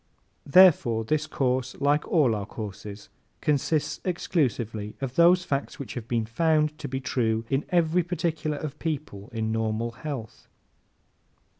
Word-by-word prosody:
Therefore 145 -9 +6
this 155 +6 0
course, 130 -3 -1
like 145 +2 +2
all 145 -9 +3
our 105 -2 -3
courses, 105 -1 -8 0.3
consists 150 +1 0
exclusively 120 - -1
of 135 -2 -4
those 175 +3 +5
facts 140 -2 -2
which 140 - -7
have 120 -2 -6
been 115 -2 0
found 150 +5 +1
to - - -5
be 130 +1 -3
true 115 -3 0
in 135 +1 +1
every 170 0 +3
particular 165 -3 -2
of 150 0 -6
people 140 -10 -4
in 110 -1 -2
normal 115 +1 -1
health. 130 -2 -7
135 Hz, 140 wpm, -26 LUFS, 115-155 Hz, 0.3 s, Therefore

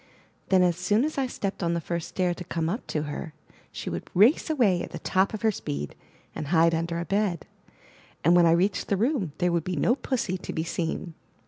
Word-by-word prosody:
Then 185 -1 +5
as 175 -2 +2
soon 205 +7 +2
as 310 -2 -2
I 265 - +1
stepped 200 -5 -4
on 170 -1 +1
the - - 0
first 170 +1 -3
stair 180 -2 0
to 180 - -7
come 165 -2 -2
up 215 +8 -4
to 150 - -1
her, 155 +1 -6 0.4
she - - -7
would - - -4
race 225 - +5
away 225 - +3
at - - -5
the - - -6
top 190 +1 +1
of 215 - -6
her 220 - +4
speed, 75 - -5 0.4
and 150 - -5
hide 165 +1 +4
under 165 +1 -1
a 170 - -3
bed; 195 -4 0 0.8
and 170 +3 +5
when 175 -1 +6
I - - +5
reached 190 +4 +1
the 200 - +1
room, 220 - 0
there 180 -1 +1
would 170 -2 +1
be 180 +1 -3
no 235 - +3
Pussy 240 -8 -2
to - - -6
be 160 - -1
seen. 165 0 -3
180 Hz, 230 wpm, -26 LUFS, 170-205 Hz, 0.8 s, when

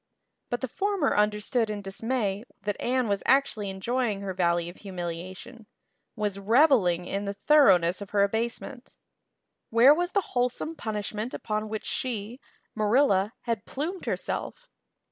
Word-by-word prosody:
But 245 - -2
the 260 - -1
former 390 - 0
under 210 0 +2
stood 225 +1 0
in 205 -1 -4
dismay 205 0 -2 0.2
that 205 -1 -1
Anne 255 -1 +1
was 200 -1 0
actually 250 -7 +2
enjoying 210 +2 -1
her 195 -1 -4
valley 170 -2 +1
of 175 - -9
humiliation 185 +5 -7 0.5
was 205 -3 -2
reveling 210 - +4
in 200 +2 -3
the 200 0 -3
thoroughness 195 - +4
of 200 - -7
her 205 -1 +3
abasement. 235 +4 -3 0.7
Where 240 +5 +7
was 350 +3 -1
the 400 - +3
wholesome 250 +6 -1
punishment 215 -1 -4
upon 215 0 -3
which 215 0 -4
she, 235 -1 -3 0.4
Marilla, 215 -2 +3
had 230 -4 -3
plumed 335 +7 -4
herself? - - -3
215 Hz, 145 wpm, -27 LUFS, 200-255 Hz, 0.7 s, Where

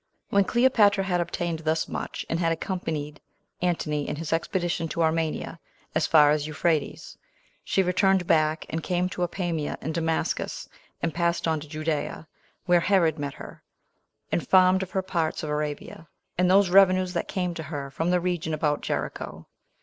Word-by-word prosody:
2. - - -4
When 200 - +6
Cleopatra 210 -4 +4
had 180 -2 0
obtained 170 -1 -3
thus 160 0 0
much, - - -5
and 165 - -1
had 165 -1 +1
accompanied 160 -4 -4 0.4
Antony 155 -4 -1
in - - -2
his 160 +1 -3
expedition 170 0 -1
to 165 +1 -1
Armenia 160 0 -1 0.3
as 155 - +1
far 150 -2 +6
as 150 0 0
Euphrates, 155 0 -2 0.4
she 195 - +1
returned 190 0 +2
back, 155 -1 +2
and 160 - -2
came 180 +1 0
to 180 - -6
Apamia 175 -4 -2
and 160 - -4
Damascus, 165 0 -2 0.4
and 165 - 0
passed 170 0 0
on 160 -1 +1
to 150 0 -11
Judea, 155 +1 -3 0.4
where 175 -1 +4
Herod 170 -4 +2
met 140 -1 -4
her, - - -11 0.7
and 170 - -1
farmed 185 0 +5
of 190 - -4
her 190 0 -1
parts 170 -5 -2
of 150 - -3
Arabia, 150 +2 -4 0.3
and 180 0 +2
those 190 -1 +5
revenues 185 -1 +5
that 170 - -2
came 180 -2 -2
to 165 - -6
her 140 -3 -5
from 165 +5 -1
the 180 0 +3
region 175 -3 -1
about 150 -1 0
Jericho. - - -4
165 Hz, 170 wpm, -26 LUFS, 155-180 Hz, 0.7 s, When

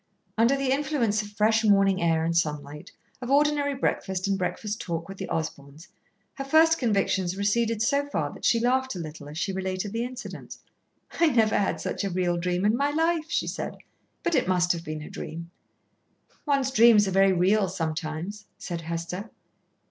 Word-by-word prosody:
Under 230 +5 +3
the 270 -1 0
influence 270 -7 +1
of 210 - -8
fresh 220 +2 +2
morning 195 -3 +4
air 165 -1 +2
and 165 0 -1
sunlight, 150 -3 -2 0.3
of 245 - -5
ordinary 285 0 +2
breakfast 190 -7 -1
and 195 - +1
breakfast 205 +3 -3
talk 165 -1 -4
with 195 0 -9
the - - -5
Osborns, 155 0 -5 0.4
her 275 - -5
first 320 +4 +4
convictions 195 -5 0
receded 220 +2 +1
so 280 +3 +1
far 285 - -2
that - - -13
she 230 - +3
laughed 260 +1 +1
a - - -5
little 150 -3 -8
as 150 - -8
she 195 +3 -2
related 190 +2 -3
the 230 +1 -1
incident. 250 +1 -8 0.6
"I 335 - +5
never 225 -7 +3
had 200 - 0
such - - -3
a 200 - -1
real 175 -1 0
dream 180 +2 -1
in 215 +2 +3
my 280 +3 +1
life," 325 +1 +1
she - - 0
said; - - -5 0.5
"but 345 - 0
it - - +2
must 180 -1 +2
have 170 -1 -3
been 155 -1 -6
a - - -9
dream." 170 +1 -7 1.0
"One's 275 -2 +1
dreams 225 -4 +6
are - - -1
very 195 +1 +4
real 190 +2 +2
sometimes," 165 +3 -4
said 170 -2 -5
Hester. 170 +5 -5
200 Hz, 185 wpm, -26 LUFS, 175-245 Hz, 1.0 s, dreams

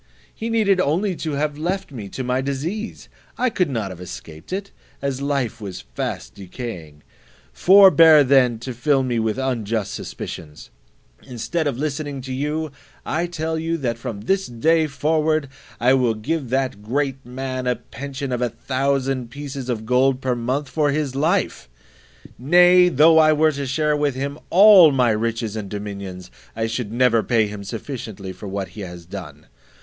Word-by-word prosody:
He 225 - -5
needed 210 -4 +2
only 180 +5 0
to 155 -2 -3
have 150 +1 -2
left 185 +2 -2
me 110 -7 -7
to 130 - -5
my 125 +1 0
disease; 155 +11 -4 0.3
I 255 -1 +1
could 180 -7 0
not 110 -7 -3
have 90 -1 -10
escaped 80 -2 -10
it, 195 +1 -4 0.3
as 140 -1 -3
life 135 -5 -2
was 95 -3 -6
fast - - -4
decaying. 90 - -8 0.5
Forbear 165 - +7
then 130 -3 +4
to 130 +1 -5
fill 135 +3 +1
me 120 -2 -1
with 110 +1 -1
unjust 115 -6 -2
suspicions: 75 -1 -8 0.5
instead 140 +6 -3
of 135 -4 -2
listening 145 -1 -3
to 130 0 -6
you, 150 +3 -2 0.3
I 170 +3 -1
tell 160 -1 -3
you, 165 +1 -1
that 120 -6 -2
from 105 -3 -6
this 195 - 0
day 160 +7 +2
forward 155 +1 0 0.3
I 125 +2 +4
will 125 -4 +2
give 130 +5 -3
that 130 -5 -1
great 135 +4 -2
man 130 +1 -4
a 125 - +2
pension 140 +3 -7
of 125 -1 -1
a 120 - +1
thousand 130 +1 -1
pieces 140 -1 -7
of 110 -3 -2
gold 130 +2 +2
per 130 -1 -1
month 130 +4 -2
for 150 0 0
his 145 -2 -1
life; 160 - 0 0.7
nay, 180 +6 +6
though 160 +1 +6
I 155 0 +6
were 155 +1 +3
to 140 -2 -4
share 150 +3 +1
with 145 -3 0
him 140 +3 -4
all 190 -4 +8
my 125 -4 +3
riches 110 0 -2
and 105 -3 -5
dominions, 100 - -7 0.2
I 110 - -1
should 115 -1 -3
never 120 -1 +3
pay 115 -1 +2
him 105 -1 -7
sufficiently 110 -4 -6
for 105 - -9
what 95 0 -4
he 105 - -10
has 90 -2 -8
done. 80 -5 -9
130 Hz, 170 wpm, -21 LUFS, 115-155 Hz, 0.7 s, all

